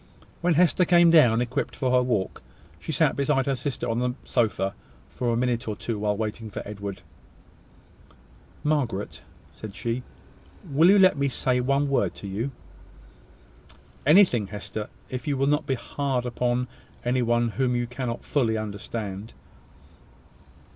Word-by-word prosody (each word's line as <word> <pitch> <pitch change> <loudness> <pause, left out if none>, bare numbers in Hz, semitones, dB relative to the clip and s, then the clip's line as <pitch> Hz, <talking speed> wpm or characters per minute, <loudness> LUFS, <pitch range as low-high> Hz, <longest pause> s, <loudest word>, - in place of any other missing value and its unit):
When 175 -1 +2
Hester 180 +2 +4
came 175 -1 +5
down, 120 -8 +6
equipped 125 +1 -2
for 130 -2 0
her 125 0 +5
walk, 120 -7 -1 0.4
she - - -5
sat - - +2
beside 140 -1 +1
her 140 - +1
sister 130 +1 -3
on 115 +1 0
the 125 0 -1
sofa 105 -5 0 0.4
for 125 - -2
a 115 - +1
minute 120 -1 0
or 105 - -2
two, 110 0 -4
while 105 -1 0
waiting 110 +1 -4
for - - -6
Edward. 100 -1 -6 1.6
"Margaret," 130 -10 -1 0.3
said 105 -2 -9
she, 120 +1 -2 0.7
"will 160 +6 +5
you 200 - +7
let 185 -6 +5
me 140 0 +2
say 125 0 0
one 140 +3 +1
word 140 -1 +1
to - - -10
you?" 105 +7 -2 1.5
"Anything, 150 - +5
Hester, 105 +2 -6 0.2
if 130 0 -5
you 140 -2 0
will 135 - +2
not 150 +1 +1
be 135 - +1
hard 130 0 -2
upon 125 +1 0 0.4
any 125 +1 +2
one 120 0 +2
whom 125 +2 0
you 120 0 0
cannot 125 -1 -5
fully 115 -6 +1
understand." 105 -1 -5
125 Hz, 155 wpm, -26 LUFS, 110-140 Hz, 1.6 s, you